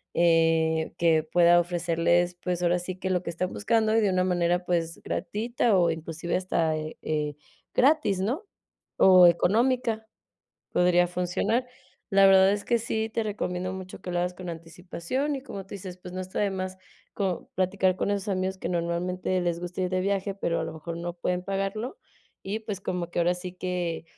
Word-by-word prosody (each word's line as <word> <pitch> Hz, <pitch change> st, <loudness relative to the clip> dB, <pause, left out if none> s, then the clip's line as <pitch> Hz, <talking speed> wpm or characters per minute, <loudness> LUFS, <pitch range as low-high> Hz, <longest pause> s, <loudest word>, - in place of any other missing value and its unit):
eh 165 Hz, -1 st, +3 dB
que 165 Hz, -2 st, +4 dB
pueda 175 Hz, +1 st, +5 dB
ofrecerles, 175 Hz, 0 st, +1 dB
pues 180 Hz, -1 st, -2 dB
ahora 175 Hz, +1 st, +2 dB
sí 180 Hz, +1 st, -5 dB
que 190 Hz, 0 st, -3 dB
lo 180 Hz, -1 st, +1 dB
que 180 Hz, -, -6 dB
están 180 Hz, +2 st, -2 dB
buscando 220 Hz, +1 st, +1 dB
y -, -, +5 dB
de 205 Hz, -, +3 dB
una 185 Hz, 0 st, +2 dB
manera, 175 Hz, 0 st, +1 dB
pues 170 Hz, -2 st, -1 dB
gratuita 220 Hz, +2 st, 0 dB
o 170 Hz, -2 st, +3 dB
inclusive 165 Hz, +1 st, -4 dB
hasta 170 Hz, -4 st, 0 dB
eh 155 Hz, 0 st, -6 dB
eh 150 Hz, -2 st, -1 dB, 0.4 s
gratis, 255 Hz, -9 st, +3 dB
¿no? 260 Hz, -, -2 dB, 0.5 s
O 185 Hz, -2 st, +8 dB
económica, 220 Hz, +5 st, +2 dB, 0.7 s
podría 175 Hz, 0 st, +4 dB
funcionar. 180 Hz, +7 st, 0 dB, 0.4 s
La 195 Hz, 0 st, +6 dB
verdad 190 Hz, 0 st, +6 dB
es 205 Hz, 0 st, -2 dB
que 235 Hz, -, +3 dB
sí 220 Hz, -1 st, -2 dB
te 225 Hz, +1 st, -2 dB
recomiendo 185 Hz, -3 st, -3 dB
mucho 185 Hz, -1 st, -8 dB
que 180 Hz, -, -5 dB
lo 175 Hz, -, 0 dB
hagas 180 Hz, +1 st, -1 dB
con 180 Hz, -1 st, -6 dB
anticipación 175 Hz, -, -4 dB
y, 270 Hz, -, -5 dB
como 200 Hz, -8 st, -7 dB
tú 195 Hz, -, -25 dB
dices, 185 Hz, -2 st, -7 dB
pues 180 Hz, 0 st, -10 dB
no 185 Hz, -, -4 dB
está 185 Hz, 0 st, -4 dB
de 205 Hz, -1 st, +2 dB
más 185 Hz, -1 st, -4 dB, 0.4 s
como 190 Hz, -4 st, -2 dB
platicar 185 Hz, 0 st, +1 dB
con -, -, -1 dB
esos 200 Hz, 0 st, -2 dB
amigos 190 Hz, -1 st, -1 dB
que 170 Hz, -, -4 dB
normalmente 180 Hz, +2 st, -1 dB
les 175 Hz, -1 st, -1 dB
gusta 180 Hz, +1 st, -5 dB
ir 185 Hz, -, +1 dB
de 185 Hz, 0 st, 0 dB
viaje, 200 Hz, 0 st, -1 dB
pero 170 Hz, -4 st, -1 dB
a -, -, -1 dB
lo -, -, -6 dB
mejor 165 Hz, +1 st, -6 dB
no 175 Hz, 0 st, -4 dB
pueden 180 Hz, +1 st, -2 dB
pagarlo. 195 Hz, -, -3 dB, 0.5 s
Y, 205 Hz, +3 st, -2 dB
pues, 210 Hz, -3 st, -5 dB
como 180 Hz, -2 st, -3 dB
que -, -, -4 dB
ahora 175 Hz, +1 st, +3 dB
sí 180 Hz, 0 st, -7 dB
que, 180 Hz, -3 st, -3 dB
180 Hz, 190 wpm, -27 LUFS, 175-195 Hz, 0.7 s, O